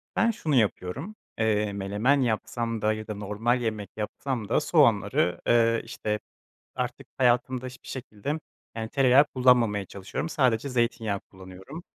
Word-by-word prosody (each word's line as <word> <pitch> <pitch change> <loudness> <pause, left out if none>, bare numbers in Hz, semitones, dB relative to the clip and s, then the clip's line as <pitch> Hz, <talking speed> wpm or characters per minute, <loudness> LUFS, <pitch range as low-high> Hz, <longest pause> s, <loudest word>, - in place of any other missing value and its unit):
Ben 230 0 +3
şunu 155 -9 -1
yapıyorum, 115 - 0 0.2
eee, 105 -2 +1
menemen 105 +8 +1
yapsam 115 -1 -1
da 110 0 +2
ya 110 0 -6
da 105 - -4
normal 105 +5 0
yemek 110 -4 -3
yapsam 110 +1 -3
da - - +3
soğanları, 105 - +2
ııı, 115 -1 +4
işte 105 -2 -3 0.6
artık - - -4
hayatımda 125 0 +2
hiçbir 125 0 -11
şekilde 130 +4 -4 0.3
yani 110 -1 -4
tereyağı 135 +2 +5
kullanmamaya 125 -7 +3
çalışıyorum, 100 - -5
sadece 130 -4 +1
zeytinyağı 115 -5 0
kullanıyorum. 95 - -11
115 Hz, 135 wpm, -27 LUFS, 105-130 Hz, 0.6 s, tereyağı